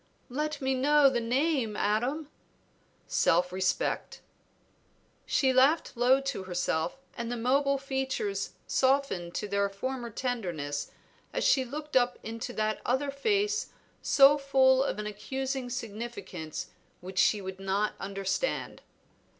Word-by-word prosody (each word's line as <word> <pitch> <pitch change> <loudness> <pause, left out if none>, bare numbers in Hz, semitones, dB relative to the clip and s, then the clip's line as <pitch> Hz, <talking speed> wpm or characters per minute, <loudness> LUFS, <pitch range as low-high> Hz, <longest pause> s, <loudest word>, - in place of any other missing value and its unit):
"Let 300 +3 -3
me 265 0 +2
know 280 +1 +5
the 245 - 0
name, 250 -1 0
Adam." 245 +9 0 0.8
"Self 180 +2 +2
respect." 185 0 -1 1.1
She 265 -2 +3
laughed 270 +5 +3
low 250 +3 +4
to 270 -8 -4
herself, 175 0 -1 0.2
and 235 0 -4
the 245 - -2
mobile 275 +4 +2
features 270 - -2
softened 260 -11 +1
to 210 - -2
their 200 0 +1
former 240 +4 -4
tenderness 175 - -3 0.4
as - - -1
she 265 - +4
looked 295 +4 -7
up 245 -1 +3
into 230 +3 -5
that 215 -1 -1
other 265 +3 0
face 410 +8 0 0.3
so 280 +1 +6
full 265 -1 +4
of 275 - -2
an 210 - -4
accusing 265 +5 -3
significance 220 - -6 0.3
which 185 +1 -4
she 210 - +4
would 190 -1 -7
not 195 +2 0
understand. 195 - -2
250 Hz, 125 wpm, -29 LUFS, 200-275 Hz, 1.1 s, so